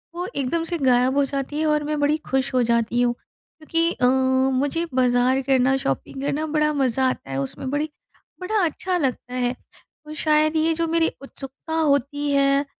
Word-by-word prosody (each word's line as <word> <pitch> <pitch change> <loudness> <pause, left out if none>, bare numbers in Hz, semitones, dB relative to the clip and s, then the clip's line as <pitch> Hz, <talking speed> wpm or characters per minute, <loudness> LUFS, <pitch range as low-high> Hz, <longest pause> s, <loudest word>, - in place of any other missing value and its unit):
वो 355 +1 -3
एकदम 280 +5 -1
से 340 +1 -2
गायब 255 -2 +2
हो 285 - +4
जाती 275 +2 -4
है 315 - +1
और 300 -1 +1
मैं 300 0 -2
बड़ी 290 +2 +2
खुश 265 0 0
हो 250 - +3
जाती 235 0 +1
हूँ, 240 -1 +2
क्योंकि 330 +6 -3
अ, 250 - 0 0.5
मुझे 285 +6 0
बाज़ार 255 +1 +2
करना 265 0 +2
शॉपिंग 265 - -3
करना 290 +2 -1
बड़ा 300 0 +2
मज़ा 265 -2 +1
आता 135 - -6
है 135 - -3
उसमें 200 - -5
बड़ी 295 +3 -1 0.5
बड़ा 395 +2 0
अच्छा 360 +3 -2
लगता 255 -4 -2
है। 250 0 -1 0.5
और 305 - -7
शायद 310 0 +2
ये 320 +1 +2
जो 330 +1 -1
मेरी 330 0 +2
उत्सुकता 275 +3 -9
होती 290 -2 +1
है 275 0 +3
280 Hz, 185 wpm, -23 LUFS, 255-310 Hz, 0.5 s, हो